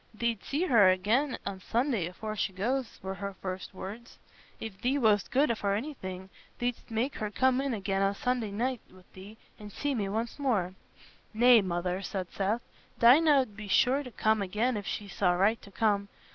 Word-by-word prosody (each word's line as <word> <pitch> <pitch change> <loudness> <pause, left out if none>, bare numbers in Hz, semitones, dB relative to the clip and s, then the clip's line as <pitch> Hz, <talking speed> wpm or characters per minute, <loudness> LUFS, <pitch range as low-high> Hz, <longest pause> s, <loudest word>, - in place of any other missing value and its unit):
"Thee't 230 -2 -1
see 295 +5 -1
her 225 - +6
again 220 +10 +1
o' 195 -1 -4
Sunday 230 - 0
afore 215 +4 -6
she 195 - -1
goes," 240 +6 -2
were 190 0 -3
her 200 0 -6
first 185 0 -5
words. 210 +5 -9 0.4
"If 205 -4 -8
thee 260 +3 +1
wast 215 -6 +3
good 275 -2 +2
for 200 -2 0
anything, 190 -7 -6 0.3
thee'dst 245 0 -3
make 235 +5 -1
her 215 - -3
come 260 +4 +2
in 275 -1 -1
again 195 -1 -1
o' 195 0 +2
Sunday 245 0 -1
night 240 +4 -2
wi' 185 0 -18
thee, 200 +4 -12 0.2
and 210 -1 -9
see 285 +7 -2
me 205 -6 -1
once 225 +6 -3
more." 210 -10 0 0.6
"Nay, 240 0 +7
Mother," 180 0 -2
said 185 -2 -4
Seth. 210 +4 -1 0.4
"Dinah 280 +4 +6
'ud 215 -6 -6
be 210 -1 -8
sure 255 +7 +3
to 265 - -8
come 220 -2 +1
again 215 +6 0
if 205 -2 -5
she 205 - -4
saw 180 -1 +1
right 200 +6 +2
to - - -13
come. 200 -1 +1
215 Hz, 190 wpm, -29 LUFS, 195-245 Hz, 0.6 s, Nay